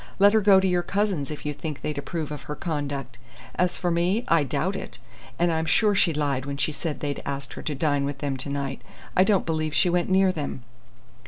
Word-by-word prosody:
"Let 200 +1 +6
her 220 - +4
go 200 -1 +7
to 190 - +1
your 180 -1 +2
cousins' 195 -7 -1
if 150 -1 -7
you 150 - -1
think 150 0 -6
they'd 150 -2 -2
approve 155 +1 -4
of 150 -2 -5
her 150 - -2
conduct. 145 -6 -4 0.3
As 180 0 0
for 175 -2 0
me, 180 +7 +1
I 165 -3 +4
doubt 135 - -1
it. - - -6 0.4
And 175 0 +2
I'm 160 0 -1
sure 210 +5 +4
she 190 -3 +3
lied 145 -4 -1
when 140 0 -3
she 150 - +1
said 155 0 -4
they'd 145 -1 -3
asked 140 0 -4
her - - -7
to 150 - -3
dine 145 0 +1
with 140 0 -3
them 140 -1 -2
to 130 +2 -4
night. 140 -1 -3 0.3
I 185 - +6
don't 200 -1 +2
believe 155 -2 -1
she 175 - +4
went 175 +1 +1
near 190 0 +4
them." 145 -6 -5
155 Hz, 235 wpm, -25 LUFS, 140-180 Hz, 0.4 s, go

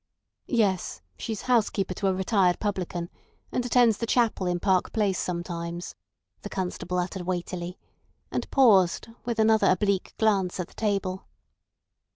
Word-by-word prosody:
"Yes. 205 -7 0
She's 220 -3 -5
housekeeper 215 -6 +1
to 195 +2 -1
a 190 - +3
retired 190 -2 +2
publican, 180 -4 -3 0.4
and 250 - 0
attends 240 -3 +4
the 230 - -2
chapel 225 -6 +2
in 175 0 0
Park 185 -1 +2
Place 205 -4 +1
sometimes," 170 -1 -4 0.5
the - - -7
constable 180 -1 -3
uttered 180 0 -3
weightily, 180 0 -3 0.5
and - - -3
paused, 210 -9 +4 0.2
with 235 -1 -2
another 220 0 +4
oblique 195 +1 +1
glance 195 -5 +1
at 180 - -3
the - - -19
table. 195 -3 -1
190 Hz, 140 wpm, -27 LUFS, 180-220 Hz, 0.5 s, attends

